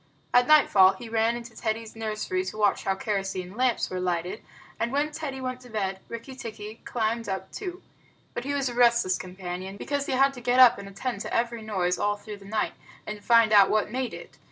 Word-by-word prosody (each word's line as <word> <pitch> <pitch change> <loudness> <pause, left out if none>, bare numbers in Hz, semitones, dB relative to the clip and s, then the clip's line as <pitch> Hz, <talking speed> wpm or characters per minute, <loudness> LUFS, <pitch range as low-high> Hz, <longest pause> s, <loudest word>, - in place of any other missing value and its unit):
At 245 0 +5
nightfall 200 -11 +6
he 225 +4 -9
ran 225 +1 +2
into 235 -1 -8
Teddy's 220 0 -3
nursery 215 -4 -2
to 200 +3 -6
watch 205 -2 +2
how 195 - +1
kerosene 195 -2 -3
lamps 250 0 +1
were 185 - -2
lighted, 180 +3 -2 0.4
and 235 +1 0
when 290 +2 0
Teddy 295 -4 -5
went 255 -1 -4
to 250 - -14
bed 195 -3 -2
Rikki 235 +3 -7
tikki 220 -3 -8
climbed 230 -1 -1
up 190 0 -4
too. 370 -2 -6 0.5
But 240 - -4
he 285 +2 -2
was 275 -2 0
a 245 - -3
restless 235 -6 +3
companion, 185 +1 -6
because 285 +5 -2
he - - -1
had 275 +1 +4
to 245 - -10
get 245 +1 +2
up 250 -5 +8
and 200 - -8
attend 200 +1 -4
to - - -5
every 235 0 0
noise 185 -5 -1
all 205 0 +1
through 205 0 -9
the 200 - -15
night, 215 +2 -1 0.3
and 210 -1 -6
find 230 -2 +5
out 200 -2 +7
what 215 0 +1
made 255 0 -2
it. - - -12
220 Hz, 215 wpm, -27 LUFS, 195-245 Hz, 0.5 s, up